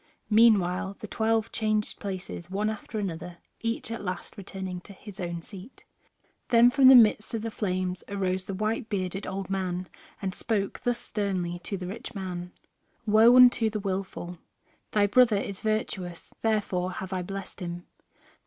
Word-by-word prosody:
Meanwhile 200 -4 +4
the 215 - -7
twelve 225 +1 0
changed 215 -1 -1
places 185 -3 -6
one 210 +3 0
after 220 0 -7
another, 175 -3 -4 0.2
each 230 0 -2
at 230 - -4
last 180 -1 -5
returning 190 -3 -6
to 200 - -12
his 205 +1 -12
own 170 -2 -4
seat. 200 +7 -12 0.6
Then 240 +1 +6
from 270 0 +6
the 265 - +10
midst 220 -1 +5
of 220 - -3
the 225 - -3
flames 185 -3 -2
arose 190 -2 -1
the 195 - -4
white 220 +3 -1
bearded 190 -1 -2
old 190 0 -4
man 185 -1 -2 0.3
and 190 -2 -3
spoke 200 -2 -2
thus 245 -1 +1
sternly 185 -6 -2
to 195 +2 -4
the 180 - -6
rich 225 +5 -7
man: 180 -2 -5 0.5
"Woe 220 +3 +6
unto 245 -3 +7
the 215 0 -3
willful! 190 -3 -4 0.5
Thy 210 -1 +4
brother 225 +1 +5
is 200 -1 -4
virtuous, 195 -5 -3
therefore 195 -5 0
have 190 +1 -5
I 185 - -1
blessed 195 +2 -7
him. 175 -1 -5
195 Hz, 165 wpm, -27 LUFS, 185-220 Hz, 0.6 s, the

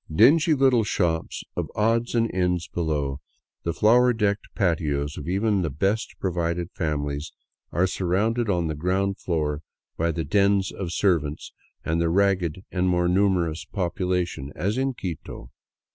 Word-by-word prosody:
Dingy 150 - +5
little 130 -4 +4
shops 85 -5 -1
of - - -2
odds 115 +3 +1
and 115 -1 +1
ends 90 -2 0
below, 75 -5 -2 0.4
the 85 - -1
flower 120 +7 +4
decked 105 -2 0
patios 75 -6 0
of 75 - -7
even 100 +2 +1
the 80 - -1
best 95 +10 -1
provided 85 -1 -2
families 75 -3 -3 0.4
are 90 +3 +2
surrounded 105 +6 0
on 90 -3 +1
the 80 - -1
ground 95 +5 -1
floor 75 -4 -1 0.4
by 85 +1 +1
the 80 0 -2
dens 100 +3 +2
of 90 -4 -5
servants 80 -7 0 0.3
and 80 +1 0
the 85 - +2
ragged 95 -2 +1
and 90 0 +1
more 90 -1 +2
numerous 90 -4 +1
population, 90 -5 -2
as 100 +4 -1
in 135 0 -1
Quito. 80 - -7
90 Hz, 145 wpm, -25 LUFS, 80-100 Hz, 0.4 s, Dingy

